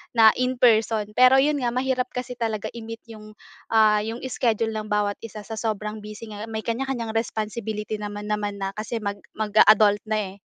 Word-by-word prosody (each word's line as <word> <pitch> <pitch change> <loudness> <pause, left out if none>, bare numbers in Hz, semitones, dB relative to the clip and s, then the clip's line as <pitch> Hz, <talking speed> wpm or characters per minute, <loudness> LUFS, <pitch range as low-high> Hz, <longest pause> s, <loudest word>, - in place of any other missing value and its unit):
na 225 - +6
in 255 0 +1
person. 220 -3 +3
Pero 255 +4 +6
yun 295 -1 +1
nga, 240 -1 -1
mahirap 255 0 0
kasi 250 0 -5
talaga 220 -3 -2
i-meet 225 -1 -8
yung, 215 -1 -12 0.3
ah, 215 -1 +4
yung 225 +3 -5
schedule 225 -2 0
ng 215 -1 -4
bawat 210 -1 0
isa 215 -2 -9
sa 220 +1 -6
sobrang 215 -1 -3
busy 215 +1 -9
nga. 210 +2 -7
May 220 -1 -4
kanya-kanyang 235 -1 -2
responsibility 215 -1 -3
naman 210 0 -5
naman 205 -1 -1
na 195 - -2
kasi 220 +2 -4
mag 200 0 -3 0.2
mag-a-adult 215 -1 +5
na, 215 0 0
eh. - - -14
220 Hz, 185 wpm, -24 LUFS, 210-230 Hz, 0.3 s, na